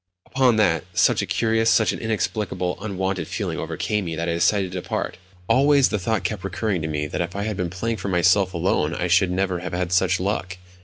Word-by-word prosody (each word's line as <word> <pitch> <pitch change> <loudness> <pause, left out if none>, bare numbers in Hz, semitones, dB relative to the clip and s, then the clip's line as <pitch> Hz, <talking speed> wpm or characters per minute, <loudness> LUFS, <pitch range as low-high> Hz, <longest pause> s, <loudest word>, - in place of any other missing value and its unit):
Upon 130 -3 +2
that 85 -8 +2
such - - +3
a - - -4
curious, 115 0 +1
such 110 - +4
an - - -6
inexplicable, 105 -4 -2
unwonted 95 -3 -2
feeling - - -3
overcame 105 -2 -2
me 80 -1 -4
that 85 +1 -3
I 85 - 0
decided 95 +2 +1
to 90 -1 -4
depart. - - -4 0.3
Always 135 +3 +4
the 105 - -1
thought 110 +3 -1
kept 105 -4 -3
recurring 100 -1 -2
to 80 - -3
me 75 -1 -2
that 75 - -3
if 85 +2 -4
I 100 - -2
had 105 -1 -2
been 90 -2 -2
playing 110 +6 -3
for 100 - -5
myself 95 +1 +3
alone 85 -2 0
I 90 - -2
should 90 +2 +3
never 90 0 -1
have 90 0 -6
had 90 -1 -2
such 95 0 +2
luck. 95 -1 -2
95 Hz, 220 wpm, -23 LUFS, 90-110 Hz, 0.3 s, such